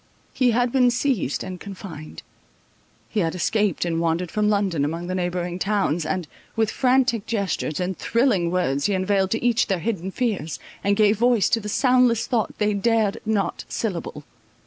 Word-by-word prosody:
He 255 -2 +3
had 240 +1 +2
been 250 -1 +4
seized 240 - 0
and 185 -1 -7
confined; 185 -6 -9 0.8
he 220 - -2
had 165 -3 0
escaped 200 0 0
and 165 -1 -1
wandered 170 +1 -1
from 210 0 +1
London 195 -8 +1
among 165 +4 -2
the 185 - -3
neighbouring 180 -1 -2
towns, 185 -6 0
and, 185 -4 -2 0.3
with 220 -2 +1
frantic 250 -4 +2
gestures 195 -8 -2
and 180 +1 -2
thrilling 230 -8 +1
words, 155 -5 0
he 200 - 0
unveiled 190 0 +1
to 225 +3 -1
each 240 -1 +3
their 195 - +1
hidden 190 -1 -3
fears, 195 - -2 0.3
and 200 0 +2
gave 210 0 +3
voice 240 -3 +3
to 230 - +3
the 210 -1 -6
soundless 250 -1 +3
thought 230 -4 -1
they 210 0 +1
dared 215 0 +1
not 200 -5 0
syllable. 170 -8 -4
200 Hz, 170 wpm, -23 LUFS, 175-230 Hz, 0.8 s, been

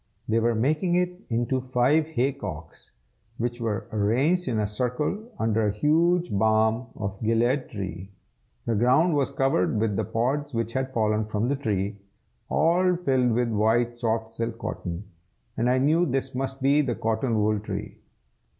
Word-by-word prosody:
They 115 +1 +2
were 115 0 +1
making 155 +9 +1
it 180 +1 -1
into 120 +3 0
five 130 +5 +2
hay 135 -3 0
cocks, 80 - -8 0.5
which 120 +1 -3
were 110 -3 -2
arranged 130 - +1
in 120 -3 0
a 105 - +1
circle 125 - -2
under 110 -1 +1
a - - +1
huge 170 - +2
balm 110 +3 +2
of 100 -2 -5
Gilead 120 +4 +1
tree. 95 -2 -6 0.6
The 115 - 0
ground 130 - +3
was 140 -2 +1
covered 125 -7 +1
with 110 -2 0
the - - +1
pods 135 +4 -1
which 115 0 -2
had 130 0 -2
fallen 110 -2 +1
from 110 +3 -1
the 140 - +1
tree, 105 -6 -2 0.5
all 180 +3 +3
filled 130 -8 +1
with 120 +1 +1
white 115 +2 +2
soft 110 -1 -1
silk 115 0 -4
cotton, 90 -4 -5 0.5
and 120 +2 +1
I 125 - +3
knew 155 +6 +3
this 135 0 -2
must 135 +1 -4
be 140 +2 +4
the 125 -5 -1
cotton 115 +1 0
wool 105 0 +2
tree. 105 - -6
120 Hz, 165 wpm, -26 LUFS, 110-140 Hz, 0.6 s, be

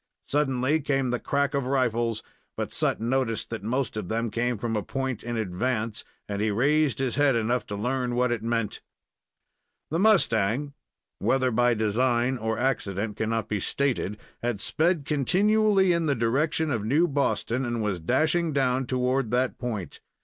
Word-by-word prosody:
Suddenly 140 0 +1
came 135 -3 0
the 125 - -1
crack 140 +1 0
of 140 -3 -1
rifles, 120 -4 0 0.3
but - - -3
Sut - - +1
noticed 115 -1 -1
that 115 - -4
most 125 +4 -2
of 105 -4 -4
them 115 0 -1
came 120 +1 0
from 115 +1 -2
a 105 - 0
point 130 +1 -3
in 120 0 -3
advance, 110 +2 -2 0.2
and 100 0 -3
he 110 - +1
raised 145 +6 +2
his 130 -2 -1
head 145 -3 +4
enough 115 +2 0
to 105 - -4
learn 125 +3 -1
what 125 0 +2
it 120 -3 -1
meant. 115 -2 -2 1.1
The 165 - 0
mustang 140 - +2 0.5
(whether 130 -1 +2
by 120 +1 +3
design 120 +3 +1
or 110 0 -1
accident 105 -5 -1
cannot 110 0 -1
be 105 - -1
stated) 120 -3 -1 0.2
had 120 -4 -1
sped 160 - +1
continually 190 - +3
in 170 -1 0
the 140 - +2
direction 145 +7 0
of 115 -5 -1
New 145 +11 +3
Boston, 130 -3 0
and 120 -2 -2
was 100 -4 -1
dashing 155 - +1
down 130 -2 +1
toward 130 -1 0
that 125 +2 0
point. 110 - -4
125 Hz, 165 wpm, -26 LUFS, 115-140 Hz, 1.1 s, head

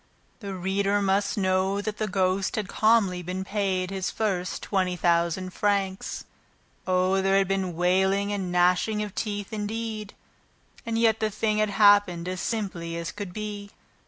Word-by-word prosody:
The 200 -4 -6
reader 195 +2 0
must 200 +1 +1
know 190 0 +1
that 210 0 -4
the 215 - 0
ghost 190 -1 0
had 215 -3 -2
calmly 210 -5 +2
been 180 +2 -4
paid 190 -2 -1
his 190 -1 -2
first 190 -4 -2
twenty 185 -3 0
thousand 170 +1 +1
francs. 200 -2 -1 0.6
Oh, 185 +1 +2
there 195 0 +3
had 195 -1 +2
been 190 -2 -1
wailing 190 +3 +2
and 190 -3 -3
gnashing 180 +4 +2
of 205 -2 -6
teeth, 205 0 -4
indeed! 215 0 -4 0.7
And 225 0 -1
yet 225 -1 +3
the 220 - +1
thing 215 0 0
had 215 -1 +2
happened 205 -4 +4
as 185 -1 -3
simply 180 -7 -3
as 170 0 -4
could 205 -3 -6
be. 205 0 -6
195 Hz, 160 wpm, -26 LUFS, 185-210 Hz, 0.7 s, happened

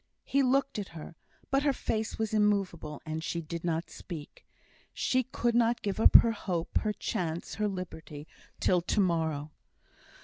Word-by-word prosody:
He 275 - +2
looked 270 -1 +2
at 200 - -4
her, 160 +1 -9 0.4
but 275 0 +3
her 285 -1 +2
face 220 -3 -2
was 220 -1 -2
immovable, 195 -8 0
and 155 0 -4
she 170 - -2
did 165 +1 -6
not 165 0 -1
speak. 160 -5 -9 0.5
She 255 - +2
could 240 -1 -1
not 235 0 +2
give 200 0 -2
up - - +6
her 230 - +9
hope, 180 -6 -1
her 215 - 0
chance, 175 -6 -3
her 210 - +3
liberty 160 -6 -6 0.3
till 180 -2 +3
to 175 - 0
morrow. 160 -5 0
190 Hz, 165 wpm, -30 LUFS, 165-225 Hz, 0.5 s, her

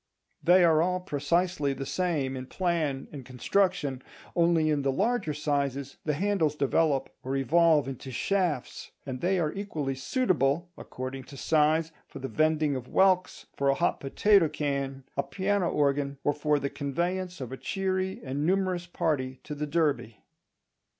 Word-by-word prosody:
They 180 +1 +6
are 160 -2 +5
all 180 +2 +1
precisely 165 -2 0
the 135 0 -5
same 150 -6 -1
in 130 0 -6
plan 160 -7 -1
and 140 -3 -8
construction, 140 - 0 0.3
only 170 -2 +3
in 145 -1 +1
the 135 0 +1
larger 200 - 0
sizes 140 -2 -2
the 150 -2 +1
handles 175 -4 +1
develop 145 -1 +1
or 130 +1 -3
evolve 150 +1 +4
into 135 0 -6
shafts; 170 +1 -1 0.2
and 130 -2 -5
they 185 +2 +2
are 155 -2 0
equally 155 -9 -3
suitable, 165 - 0
according 130 +1 -7
to 140 - -11
size, 155 +2 +2 0.2
for - - -10
the 135 -1 -4
vending 155 +2 +1
of 130 -1 -5
whelks, 185 +2 +2
for 140 0 +1
a 135 - +3
hot - - 0
potato 180 +5 +3
can, 140 -2 -3
a 140 - +2
piano 195 +2 0
organ, 140 -1 0
or 145 - +2
for 150 0 +1
the 140 -1 -3
conveyance 175 +5 -2
of 130 -2 -6
a 130 - -5
cheery 190 +2 -2
and 140 +1 -3
numerous 185 0 0
party 130 -7 -1
to 150 - -6
the 150 +1 -3
Derby. 145 -8 0
150 Hz, 160 wpm, -28 LUFS, 135-175 Hz, 0.3 s, They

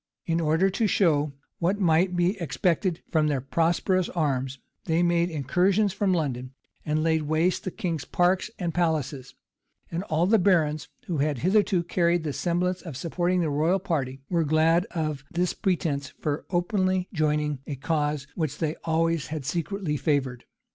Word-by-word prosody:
[] - - -65
In 165 0 0
order 165 +5 +2
to 215 +3 +1
show 155 -7 +2 0.3
what 185 +4 +1
might 180 0 +3
be 175 +3 +2
expected 170 +3 0
from 155 -2 +3
their 145 -3 +1
prosperous 170 +6 +1
arms, 135 -5 -1 0.3
they 165 0 +2
made 170 0 +2
incursions 180 - +1
from 200 -1 +1
London, 130 -6 -2 0.3
and 155 0 0
laid 160 -1 +2
waste 155 +4 0
the - - 0
king's 165 -5 -3
parks 180 - +1
and 170 -3 -2
palaces; 155 -6 -1 0.6
and 170 +1 -2
all 160 0 +1
the 215 +3 +4
barons, 155 -6 +2 0.2
who 175 - -2
had 145 -1 +1
hitherto 185 - +2
carried 170 -1 +1
the 150 -3 -2
semblance 180 +2 -1
of 160 -8 -7
supporting 175 +4 0
the 160 -3 0
royal 160 +6 +2
party, 135 -8 -2
were 170 -2 +1
glad 160 +3 +3
of 155 -5 -3
this 175 0 0
pretence 155 -8 -1
for 150 0 -3
openly 185 0 +1
joining 150 -3 0
a 145 - -3
cause 150 0 -1
which 155 -5 -2
they 155 -1 -1
always 165 -1 +1
had 150 -3 -5
secretly 170 +1 -2
favored. 135 -5 -1
165 Hz, 165 wpm, -26 LUFS, 150-180 Hz, 0.6 s, the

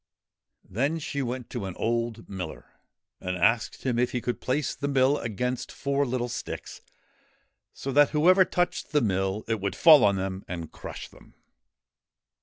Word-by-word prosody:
Then 140 - 0
she 145 -2 -3
went 125 -1 -4
to 120 -6 -4
an 95 -2 -6
old 115 0 -2
miller 90 -5 -7 0.5
and 90 0 -3
asked 110 +5 +1
him 125 -3 0
if 125 - +1
he 125 - 0
could 120 0 -3
place 140 +3 -1
the 140 - -4
mill 140 0 +3
against 125 +3 -3
four 140 0 -1
little 125 0 -1
sticks, 120 - -6 0.9
so 135 - -5
that 145 +1 +5
whoever 180 +5 +5
touched 180 -2 -2
the 150 - +4
mill 95 -1 0
it 110 -2 -1
would 100 0 -2
fall 155 -4 +8
on 100 -1 +4
them 95 0 -3
and 85 -3 -6
crush - - -8
them. - - -19
120 Hz, 165 wpm, -27 LUFS, 100-140 Hz, 0.9 s, fall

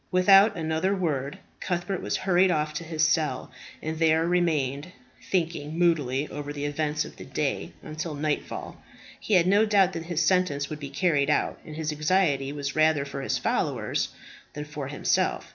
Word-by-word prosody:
Without 195 +2 +6
another 160 +4 0
word 145 -7 -2 0.2
Cuthbert 175 +1 -2
was - - -1
hurried 185 0 +3
off 155 -2 0
to 155 - -4
his 160 -1 +1
cell, 155 -1 0 0.3
and 160 0 -3
there 160 0 +3
remained, 155 -5 0 0.4
thinking 165 -4 -1
moodily 150 -5 +1
over 145 0 -6
the 145 0 -4
events 150 +1 -1
of - - -12
the - - -9
day, - - -3
until 155 0 -5
nightfall. 150 +1 -3 0.4
He 210 - +1
had 175 -2 +5
no 200 +3 +4
doubt 200 -4 +3
that 165 -1 -5
his 170 -2 0
sentence 170 -7 +1
would 155 - -5
be 140 -2 -6
carried 145 -1 +1
out, 150 - 0
and 155 - -9
his 155 -1 -2
anxiety 150 -3 +1
was 140 -1 -4
rather 155 -2 +3
for 140 -1 -6
his 135 - -1
followers - - -1 0.4
than 150 0 -5
for 150 -2 -6
himself. 140 +1 0
155 Hz, 175 wpm, -26 LUFS, 145-175 Hz, 0.4 s, Without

